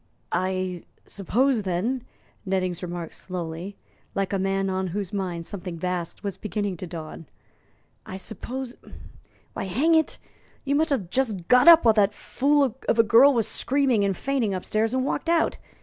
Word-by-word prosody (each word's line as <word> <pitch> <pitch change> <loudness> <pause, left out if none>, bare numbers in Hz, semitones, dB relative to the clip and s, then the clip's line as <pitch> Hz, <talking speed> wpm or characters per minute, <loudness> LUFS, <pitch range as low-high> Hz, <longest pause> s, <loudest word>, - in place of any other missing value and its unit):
"I 185 -1 -1 0.2
suppose, 240 +5 +1
then," 205 +7 -1 0.4
Nettings 185 -3 -1
remarked 175 -2 -5
slowly, 180 +1 -6 0.4
like 195 0 -1
a 195 - +1
man 195 0 0
on 190 0 -1
whose 195 +1 -4
mind 180 -4 -3
something 180 -3 -6
vast 180 +1 -4
was 200 -2 -4
beginning 205 -2 -3
to 180 - -6
dawn, 165 -2 -8 0.8
"I 185 - -8
suppose 240 +5 -6 0.8
why, - - -4
hang 275 - +2
it, 320 -1 +2 0.5
you 280 - 0
must 315 +3 +2
have 210 - -1
just 215 -10 -1
got 250 +5 +5
up 335 -4 +9
while 225 - +7
that 210 -1 +2
fool 275 -1 +1
of - - +3
a 230 - +6
girl 245 +5 +6
was 230 -3 +1
screaming 265 -6 +1
and 195 -2 0
fainting 255 -8 0
upstairs, 215 +5 -1
and 260 0 0
walked 330 - -2
out. 335 -1 +2
200 Hz, 165 wpm, -25 LUFS, 185-250 Hz, 0.8 s, up